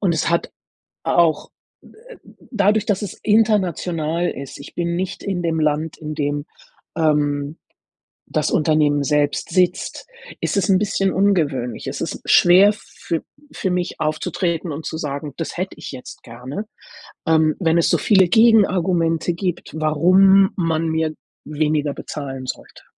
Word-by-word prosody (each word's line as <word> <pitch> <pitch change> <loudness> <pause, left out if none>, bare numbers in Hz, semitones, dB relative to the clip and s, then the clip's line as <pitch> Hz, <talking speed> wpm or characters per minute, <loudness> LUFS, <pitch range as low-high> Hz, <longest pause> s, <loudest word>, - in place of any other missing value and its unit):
Und 185 -5 +1
es 160 - 0
hat 170 - 0 0.5
auch, 165 -3 +2 0.3
äh, - - -16 0.3
dadurch, 210 -2 +2
dass 205 -1 0
es 205 - -5
international 180 -6 +1
ist 140 0 -8
ich 140 - -12
bin 170 0 -2
nicht 185 +1 -4
in 190 -3 -3
dem 165 -1 -1
Land, 155 +1 0
in 155 -1 -6
dem, 145 0 -2 0.5
ähm, 150 -1 0 0.8
das - - +1
Unternehmen 150 -2 +2
selbst 145 +1 0
sitzt, 180 -1 0 0.3
ist - - -2
es 200 +1 0
'n 190 - +5
bisschen 195 -1 0
ungewöhnlich. 150 - 0
Es - - -4
ist - - -4
schwer 185 +4 +6
für 170 -5 -6 0.3
für 190 - -2
mich 180 0 -2
aufzutreten 160 +2 -2
und 150 +2 -6
zu 160 - -4
sagen: 145 -2 -5
„Das 165 - -5
hätte 185 +2 -4
ich 155 - -8
jetzt 125 - -10
gerne.“ 125 - -7 0.6
Ähm, 160 -1 +3
wenn 165 -3 +2
es 170 - +3
so - - +3
viele 190 -4 +4
Gegenargumente 180 -7 +3
gibt, 175 0 -4
warum 185 +6 +5
man 165 -3 0
mir 160 -1 -1 0.3
weniger 150 -1 -1
bezahlen 135 -3 -7
sollte. - - -8
165 Hz, 145 wpm, -20 LUFS, 150-190 Hz, 0.8 s, schwer